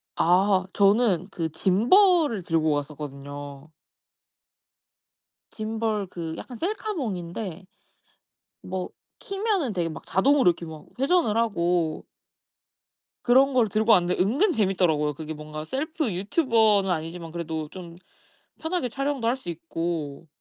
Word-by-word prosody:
아. 185 +2 +3
저는 200 -2 +3
그 165 -4 -3
짐벌을 240 - +4
들고 160 -2 +1
갔었거든요. 145 0 -6 1.8
짐벌 220 -2 -2
그 165 -3 -6
약간 250 - -8
셀카봉인데 220 - -4 1.0
뭐 185 0 -4 0.3
키면은 390 - -1
되게 175 -3 -1
막 155 - -9
자동으로 265 +3 +4
이렇게 170 0 -2
막 160 -1 -10
회전을 275 -5 +2
하고 175 -7 0 1.2
그런 265 +3 +5
걸 245 -3 +3
들고 215 +3 +2
왔는데 180 -3 +3
은근 275 - +2
재미있더라고요. 180 - +1
그게 160 +2 -6
뭔가 155 0 -7
셀프 300 - -2
유튜버는 210 - +2
아니지만 165 0 -3
그래도 160 -2 -4
좀 175 -2 -10 0.6
편하게 320 -5 -1
촬영도 275 -1 -2
할 240 - +2
수 180 - -8
있고. 165 -2 -4
190 Hz, 260 characters per minute, -25 LUFS, 165-245 Hz, 1.8 s, 그런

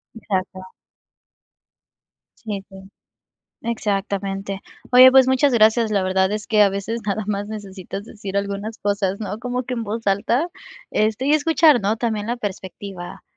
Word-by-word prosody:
Exacto. 190 -4 -3 1.8
Sí, 205 -4 -6
sí, 195 - -14 0.9
exactamente. 195 -3 -2 0.3
Oye, 255 +1 +9
pues 265 -1 +6
muchas 260 +1 +3
gracias, 220 0 +4
la 200 -2 +1
verdad 190 +1 +1
es 210 0 -3
que 215 -3 +4
a 200 - +6
veces 200 +4 -4
nada 210 +1 -1
más 205 0 -2
necesitas 200 -2 -7
decir 205 -2 -6
algunas 200 +2 -3
cosas, 200 -1 -1
¿no?, 210 0 -4
como 250 +1 -3
que 250 +1 -4
en 230 -2 -3
voz 225 +2 -5
alta, 230 - +1 0.4
este, 215 +4 0
y 285 - +3
escuchar, 310 -3 +4
¿no?, 205 +3 +1
también 220 -3 -2
la 240 +1 -2
perspectiva. 190 -3 -7
210 Hz, 150 wpm, -21 LUFS, 195-235 Hz, 1.8 s, Oye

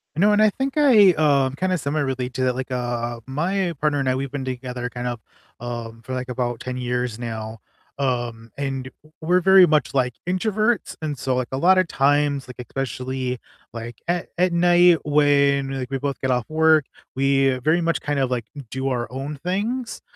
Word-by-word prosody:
No, 205 +5 +4
and 210 - +4
I 215 - +6
think 265 +5 -3
I, 225 -10 +7
um 140 -4 +2
kinda 185 +1 0
similarly 135 -4 -2
to 130 +1 -2
that, 125 -1 +1
like, 130 0 -4
uh, 120 -1 -2
my 175 +6 -1
partner 150 -1 +1
and 135 -2 0
I, 130 - +1
we've 135 0 -3
been 140 -2 -4
together 125 -1 -4
kind 125 0 -5
of, 120 -2 -3 0.4
um, 115 -1 -6
for, 130 - -6
like, 130 0 -3
about 120 -2 -2
10 125 0 -5
years 125 -2 -2
now, 110 -2 -6 0.4
um, 120 -4 -2
and 135 -2 -3 0.2
w 155 - -21
we're 175 +3 +3
very 190 0 +7
much, 150 -5 +1
like, 125 -3 +1
introverts, 215 +4 0
and 150 -3 -3
so, 130 0 -1
like, 125 -1 -1
a - - 0
lotta 185 +4 +4
times, 145 -2 +1
like, 125 - -10
especially, 130 0 -4 0.3
like, 115 0 -7
at 175 0 0
at 180 0 +2
night 175 0 +5
when, 140 -2 +3
like, 130 -2 -4
we 135 - -1
both 140 0 -3
get 130 - -2
off 125 -1 0
work, 160 -1 +4 0.3
we 135 0 +3
very 160 +3 +3
much 170 -1 0
kind 145 -1 -1
of, 135 -2 +1
like, 120 -3 -2 0.2
do 130 +2 -2
our 120 -3 -2
own 135 +3 -5
things, 225 +7 -2
135 Hz, 195 wpm, -22 LUFS, 125-165 Hz, 0.4 s, I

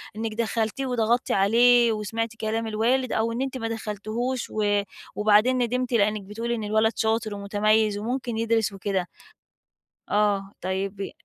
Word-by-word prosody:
إنِك 220 0 -3
دخَّلتيه 225 +3 -1
وضغطِّتِ 240 -1 +1
عليه 235 +4 +5
وسمعتِ 225 +1 -2
كلام 225 +1 -1
الوالد، 235 +4 +1
أو 225 +1 0
إن 235 - -3
أنتِ 265 -1 -3
ما 225 -2 -3
دخَّلتيهوش 225 +3 -3
و 205 -1 +1 0.3
وبعدين 215 +4 +4
ندِمتِ، 250 +1 -1
لأنِك 210 -1 +2
بتقولي 230 +4 -3
إن 220 - -4
الولد 220 +1 +2
شاطر 220 -1 0
ومتميِّز 210 +1 +1
وممكن 240 +2 -3
يدرس 225 -1 +1
وكده؟ 195 -2 -2 1.0
آه، 205 -1 +1
طيب 190 +1 -3
ي - - -4
220 Hz, 145 wpm, -25 LUFS, 210-235 Hz, 1.0 s, عليه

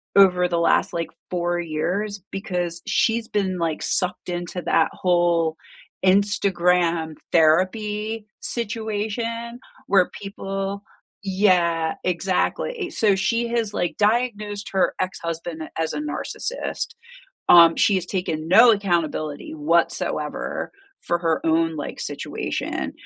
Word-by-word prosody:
over 180 -2 +6
the 170 -1 0
last, 170 - +2
like, 170 -1 -2 0.2
4 175 -1 0
years 180 +5 -2
because 180 -3 -3
she's 225 0 +1
been, 190 -3 -1
like, 165 -2 -1
sucked 180 -1 0
into 175 0 -4
that 165 - +3
whole 170 -3 +1 0.5
Instagram 180 -4 +2 0.2
therapy 210 +6 +2
situation 230 +1 -3 0.3
where 190 -3 +4
people 195 0 -4 0.4
yeah, 180 -5 +2
exactly 190 - -1
so, 210 -3 +2
she 230 +4 0
has, 230 -3 -1
like, 175 - -2
diagnosed 210 -2 0
her 190 - +2
ex-husband 170 -3 -4
as 160 -1 0
a - - -3
narcissist, 465 +9 -3 0.5
um, 170 -1 +8
she 200 - +4
has 185 -1 -1
taken 165 -4 -3
no 230 +5 +8
accountability 170 -7 -1
whatsoever 165 +3 -1 0.3
for 175 - -1
her 165 -2 +1
own, 165 0 +2
like, 145 - -6
situation, - - -4
185 Hz, 110 wpm, -23 LUFS, 170-210 Hz, 0.5 s, um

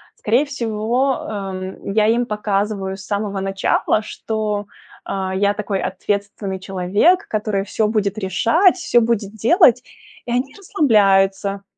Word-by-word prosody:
Скорее 240 +7 +1
всего, 245 0 -1
эм, 190 -2 -5
я 215 0 +3
им 235 +2 +2
показываю 205 -2 -2
с 195 - -11
самого 200 -1 -2
начала, 195 +2 0
что, 215 -1 -3 0.4
а, 190 -1 -3
я 200 +1 +2
такой 205 -2 -3
ответственный 200 +1 -3
человек, 195 - +1
который 210 -2 -1
всё 210 +1 0
будет 210 -2 -1
решать, 230 - +3
всё 245 -9 +2
будет 225 -3 -1
делать. 250 - +4 0.4
И 240 - -5
они 255 +3 -1
расслабляются 200 - +2
210 Hz, 125 wpm, -20 LUFS, 195-230 Hz, 0.4 s, делать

